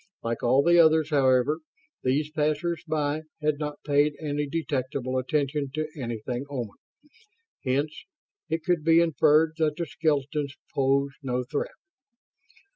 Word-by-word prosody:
Like 115 0 -2
all 130 +3 +4
the 175 +2 +5
others, 160 -1 +5
however, 135 +1 +3 0.4
these 145 +4 0
passers 155 +2 -1
by 155 -1 0 0.2
had 150 -1 0
not 150 -1 -5
paid 145 0 +3
any 145 -1 -2
detectable 135 -5 -2
attention 140 +1 -1
to 155 0 -2
anything 120 -1 -4
Oman; 120 -7 -5 0.9
hence 140 +4 -1 0.4
it 160 0 -1
could 175 -3 +1
be 165 +1 +5
inferred 160 -1 +4
that 155 -2 +1
the 170 - -2
skeletons 145 -2 -1 0.2
posed 140 0 +1
no 125 -2 -1
threat. 145 +4 -3
145 Hz, 130 wpm, -26 LUFS, 135-155 Hz, 0.9 s, the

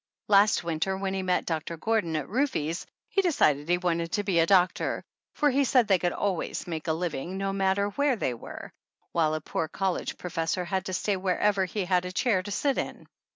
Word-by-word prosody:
Last 205 -1 +5
winter 170 +3 -1
when 190 0 -2
he 190 - -1
met 185 -1 0
Doctor 165 0 -3
Gordon 195 -3 0
at 150 -3 -2
Rufe's 190 - -1 0.2
he 390 - +2
decided 155 - +2
he 175 - +4
wanted 170 -2 -1
to 205 - +1
be 190 -4 +2
a 165 - +4
doctor, 185 -1 +2 0.3
for 295 -1 +3
he 280 +2 +3
said 250 -3 +3
they 190 -3 +4
could 175 0 0
always 190 -3 -2
make 160 -2 -5
a 160 - +2
living, 170 +1 -3
no 195 0 -1
matter 195 +1 +1
where 280 +5 +1
they 130 - -1
were, 115 - -9 0.4
while 155 -2 +2
a 155 - -3
poor 160 +1 -2
college 190 +3 -2
professor 175 0 -2
had 190 +2 -2
to 185 - -4
stay 195 +2 0
wherever 195 +1 +1
he 190 +1 -3
had 180 0 +2
a 180 - -4
chair 190 0 +1
to 195 - -8
sit 275 +7 0
in. - - -5
185 Hz, 210 wpm, -27 LUFS, 170-200 Hz, 0.4 s, Last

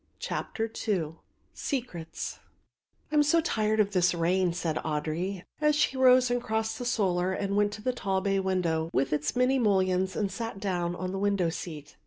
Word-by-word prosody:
CHAPTER 225 -3 -3 0.2
II 165 -6 0 0.4
SECRETS 180 - -4 0.7
"I - - -1
am 300 - +6
so 295 +3 +4
tired 220 -9 0
of 205 -1 +3
this 180 -2 +3
rain," 175 +2 +2
said 170 -2 -2
Audry, 165 +5 -2 0.2
as 300 0 +4
she 300 -2 +2
rose 255 -1 +5
and 245 0 +1
crossed 220 -1 -2
the 245 - -4
solar 185 -5 +1
and 200 +1 -2
went 205 0 +3
to 215 - -8
the 255 - 0
tall 195 -5 -1
bay 195 0 +1
window 175 -4 0
with 135 +3 +1
its 150 +1 -1
many 255 +2 +3
mullions 190 -4 +2
and 200 -2 -1
sat 225 -4 -5
down 175 -3 -1
on 185 +1 -4
the 195 - -3
window 200 -4 +1
seat. 150 -4 -8
195 Hz, 185 wpm, -28 LUFS, 175-225 Hz, 0.7 s, am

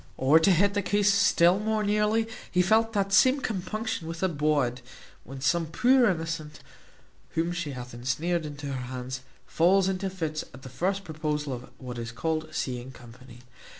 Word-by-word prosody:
Or, 140 +5 +5
to 165 - +3
hit 195 +3 +3
the 205 - 0
case 205 +1 +2
still 180 -1 +4
more 215 0 0
nearly, 210 +2 +1 0.2
he 180 0 +2
felt 225 +4 +3
the 200 -2 +1
same 260 +7 +5
compunction 215 -4 -3
with 165 +2 -5
a - - +4
bawd, 145 -6 0 0.4
when 135 +1 -9
some 165 +4 +1
poor 250 - +4
innocent, 160 -3 -4 0.8
whom 165 +1 +1
she 170 -5 -4
hath 125 -1 -8
ensnared 150 +9 -1
into 145 -1 -7
her 125 -2 -5
hands, 130 0 -5 0.2
falls 185 +3 +3
into 190 0 -1
fits 160 -5 -3
at 130 - -14
the 130 - -8
first 190 +10 -1
proposal 150 -4 -3
of 125 0 -8
what 125 -2 -7
is 115 0 -5
called 155 +5 -2
seeing 130 -4 -4
company. 125 0 -14
165 Hz, 175 wpm, -27 LUFS, 130-195 Hz, 0.8 s, Or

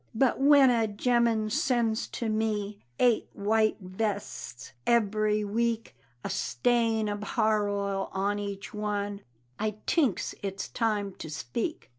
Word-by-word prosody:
But 260 +2 +2
when 275 -2 +7
a 230 -2 +2
gemman 225 0 +1
sends 240 -4 +1
to 235 - -4
me 215 -2 -1 0.2
Eight 240 -3 +3
white 215 +2 +2
vests 195 - -4 0.2
eberry 215 -2 +2
week, 230 +2 -1 0.3
A - - -3
stain 230 -3 +1
ob 205 0 -3
har 215 -1 +1
oil 200 -1 -2
on 200 +2 0
each 200 -1 -6
one, 205 -1 -2 0.4
I 215 -1 -1
tinks 275 - +1
it's 195 -1 -4
time 210 -4 -1
to 160 - -6
speak. 155 - -4
215 Hz, 130 wpm, -28 LUFS, 205-230 Hz, 0.4 s, when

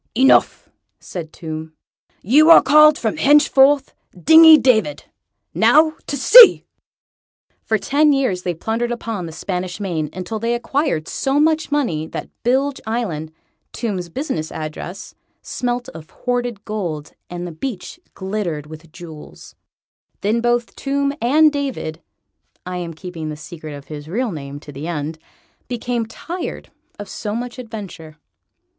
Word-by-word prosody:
"Enough," 265 +3 +3 0.3
said 165 -3 -8
Tomb; 160 -1 -7 0.5
"you 300 - +5
are 330 - +9
called 305 0 +6
from 220 -2 -2
henceforth 280 -1 +4 0.3
Dingy 320 - +8
David. 260 +1 +1 0.5
Now 310 0 +4
to 285 - -3
sea!" 455 - +8 1.0
For 220 - 0
ten 290 +8 +2
years 255 -10 0
they 175 -1 -3
plundered 225 +7 -2
upon 225 -6 -4
the - - -8
Spanish 180 +2 -5
Main, 165 -7 -3
until 185 +4 -5
they 230 +2 -1
acquired 240 - -2
so 275 +1 -1
much 315 0 +1
money 175 - -1
that - - -7
Bilge 270 +3 0
Island, 180 -10 -3 0.4
Tomb's 190 -7 -4
business 170 - -4
address, 155 +4 -7 0.3
smelt 245 0 -3
of 160 -1 -12
hoarded 245 -4 -3
gold, 175 -9 -5 0.2
and 175 0 -6
the 175 - -6
beach 200 - -6 0.2
glittered 190 -6 -4
with 155 +1 -13
jewels. 160 -3 -12 0.7
Then 220 +3 0
both 240 0 0
Tomb 280 0 -1
and 300 +6 +4
David 265 - -4 0.6
I 180 0 -5
am 170 -2 -6
keeping 165 -2 -7
the 150 - -6
secret 155 -1 -9
of 140 0 -11
his 150 -1 -9
real 230 +7 -2
name 140 -3 -7
to 145 - -11
the 145 +3 -7
end 155 -1 -4 0.5
became 240 -1 -3
tired 345 +10 -7 0.3
of 205 - -8
so 210 +2 -5
much 245 +2 -5
adventure. 200 -10 -9
215 Hz, 140 wpm, -19 LUFS, 165-270 Hz, 1.0 s, are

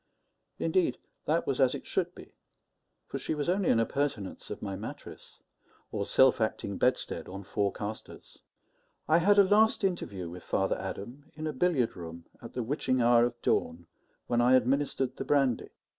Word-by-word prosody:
Indeed, 370 -3 +1 0.3
that - - +1
was - - 0
as - - +4
it - - -8
should - - -2
be; - - -13 0.7
for - - -5
she - - -2
was 145 -1 -2
only 185 +1 +1
an 115 - +4
appurtenance 115 -4 -2
of 105 - -5
my 100 -2 -3
mattress, 105 +4 -9 0.5
or 100 -2 -2
self 130 -2 +5
acting 100 -2 -2
bedstead 125 0 0
on 95 +2 -7
four 100 0 -1
castors. 105 +3 -8 0.7
I 160 +2 +5
had 200 +4 +4
a 200 - +9
last 215 +3 +3
interview 100 - -2
with 90 +2 -8
Father 95 +2 0
Adam 120 +10 -7
in 155 +1 -5
a 155 - -2
billiard 135 -5 +1
room 85 -1 -9 0.2
at 115 - -10
the 125 - -2
witching 130 +1 0
hour 120 0 +5
of 120 0 -4
dawn, 85 +1 0 0.4
when 120 0 +1
I 125 +2 +5
administered 130 0 +1
the - - -3
brandy. 135 -5 +1
120 Hz, 175 wpm, -29 LUFS, 100-145 Hz, 0.7 s, a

